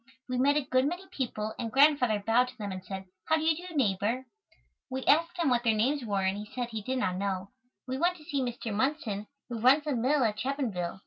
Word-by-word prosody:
We 250 -1 -1
met 285 +3 +4
a 295 - 0
good 255 +1 +2
many 355 +4 -4
people 220 -8 -3
and 230 -1 -3
Grandfather 265 -6 +4
bowed 245 +3 +4
to 255 0 -11
them 205 -3 -4
and 185 -1 -6
said, 190 0 -6 0.2
"How 315 - +3
do 315 - -1
you 320 0 +3
do, 345 - -9
neighbor?" 225 0 +1 0.6
We 260 0 -4
asked 335 +4 +3
him 340 -3 +1
what 240 -1 +2
their 225 -3 +3
names 260 +6 +1
were 200 -4 -1
and 190 +2 0
he 210 - -7
said 245 -1 -2
he 220 -2 -4
did 260 +5 -2
not 185 -7 0
know. 195 0 -2 0.4
We 260 +1 -3
went 355 +2 +2
to 310 - -15
see 285 -2 -2
Mr. 240 -3 -3
Munson, 215 -4 -1 0.2
who 235 -2 -5
runs 260 +6 +5
the 295 -3 -1
mill 260 +4 +2
at 215 -2 +1
Chapinville. 230 -11 -2
250 Hz, 240 wpm, -29 LUFS, 210-280 Hz, 0.6 s, runs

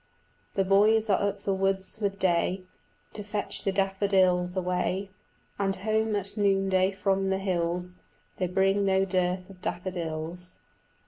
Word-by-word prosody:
The 195 - +2
boys 210 +3 +4
are 190 - +3
up 200 0 -1
the 200 - 0
woods 190 +1 0
with 200 -1 -1
day 185 0 +1 0.5
To 210 - -5
fetch 205 0 -3
the 195 - +1
daffodils 190 -2 +2
away, 185 +2 -1 0.5
And 195 -1 +1
home 215 +2 0
at 200 -1 -2
noonday 195 -2 +2
from 195 0 0
the 190 - +1
hills 180 -1 -2 0.4
They 185 - 0
bring 195 +2 +2
no 190 0 +2
dearth 185 0 -1
of 185 -1 -16
daffodils. 175 -1 -4
190 Hz, 140 wpm, -27 LUFS, 180-200 Hz, 0.5 s, boys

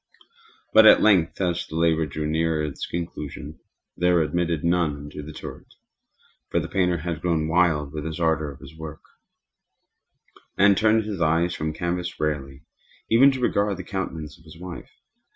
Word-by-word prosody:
But 110 0 +8
at - - +7
length, 95 -6 +3
as 85 -2 -1
the 80 - -8
labor 80 -1 +2
drew 75 +2 -4
nearer 80 0 0
to 75 - -1
its 70 - -6
conclusion, 80 -2 -6 0.4
there 90 +1 +2
were 85 - +4
admitted 85 0 -1
none 85 -4 +1
into 75 +1 -8
the 75 +1 -9
turret; - - -10 0.7
for - - +1
the - - -4
painter 90 -2 +1
had 80 0 -4
grown 80 -3 0
wild 80 -4 +2
with 75 -1 -5
the 80 +1 -5
ardor 80 -2 +1
of 70 - -12
his - - -12
work, 80 -1 -9 1.5
and 100 +1 +6
turned 110 +1 +3
his 105 -4 -5
eyes 85 +2 +2
from 80 0 -3
canvas 85 +2 -3
merely, 70 -3 -3 0.5
even 125 +5 +7
to 130 - -4
regard 100 -5 +1
the 95 - -6
countenance 85 -5 -5
of - - -21
his 80 0 -13
wife. 90 -1 -8
80 Hz, 175 wpm, -24 LUFS, 75-90 Hz, 1.5 s, But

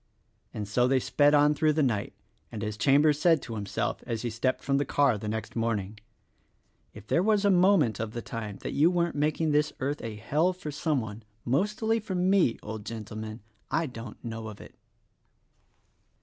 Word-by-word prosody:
And 105 -1 -5
so 120 +4 +2
they 130 0 +3
sped 145 +3 +3
on 150 +1 +5
through 155 +1 +2
the 155 0 +2
night; 110 -7 -1 0.4
and, 110 -1 -5
as 105 -1 -3
Cham 140 +6 +4
bers 150 -2 +3
said 165 0 +4
to 115 - -6
himself 100 -2 -3
as 115 -1 -3
he 120 - -2
stepped 130 +4 -1
from 140 0 +1
the - - +2
car 140 -4 +2
the 105 +1 -6
next 110 -1 -4
morning, 110 -3 -2 0.9
"If 105 -1 -12
there 170 - +2
was 210 0 +2
a 200 - +5
moment 180 - +4
of 110 -1 -4
the 120 - -4
time 110 -3 -6
that - - -4
you 155 +4 +4
weren't 170 -1 0
making 150 +2 0
this 150 0 +2
earth 140 +3 -2
a 110 -2 -5
hell 150 +12 +1
for 175 -4 -7
some 145 -1 0
one— 110 0 -7 0.2
mostly 210 - +1
for 200 -3 -5
me, 180 -8 +3
old 110 0 -6
gentleman, 110 0 -7 0.3
I 165 +2 +1
don't 115 -5 -8
know 115 -1 -5
of 105 -2 -9
it." - - -12
130 Hz, 195 wpm, -28 LUFS, 110-155 Hz, 0.9 s, on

